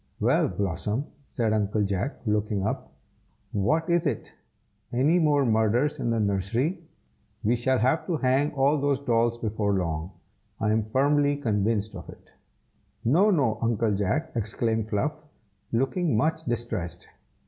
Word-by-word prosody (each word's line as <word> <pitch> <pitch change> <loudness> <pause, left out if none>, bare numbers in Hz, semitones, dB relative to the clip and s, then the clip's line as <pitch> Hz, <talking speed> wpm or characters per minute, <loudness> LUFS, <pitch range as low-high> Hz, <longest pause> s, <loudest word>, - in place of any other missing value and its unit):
"Well, - - +3
Blossom!" 100 - -2 0.2
said 115 -5 -1
Uncle 105 0 +1
Jack, 100 +7 -2
looking 105 -2 0
up, 110 - -3 0.6
"what 155 +12 +1
is 170 -1 +2
it? 125 -7 -3 0.6
any 145 +9 +3
more 145 -4 +3
murders 115 +5 +2
in - - -1
the 115 -1 +1
nursery? 105 - 0 0.6
we 115 +4 +3
shall 130 +2 +1
have 130 +7 +1
to 170 -4 0
hang 135 +2 +2
all 140 +2 +3
those 140 -1 +1
dolls 120 -3 +1
before 105 -3 -1
long, 85 -3 -2 0.5
I 105 -1 +1
am 110 +1 +2
firmly 145 +4 +2
convinced 110 -4 0
of - - -9
it." - - -14 0.7
"No! 175 - +4
no! 130 - +2
Uncle 115 -1 +1
Jack," 130 - -1
exclaimed 110 0 -1
Fluff, 150 +9 -1 0.5
looking 135 - +1
much 160 +5 0
distressed. 110 - -3
115 Hz, 140 wpm, -26 LUFS, 105-145 Hz, 0.7 s, No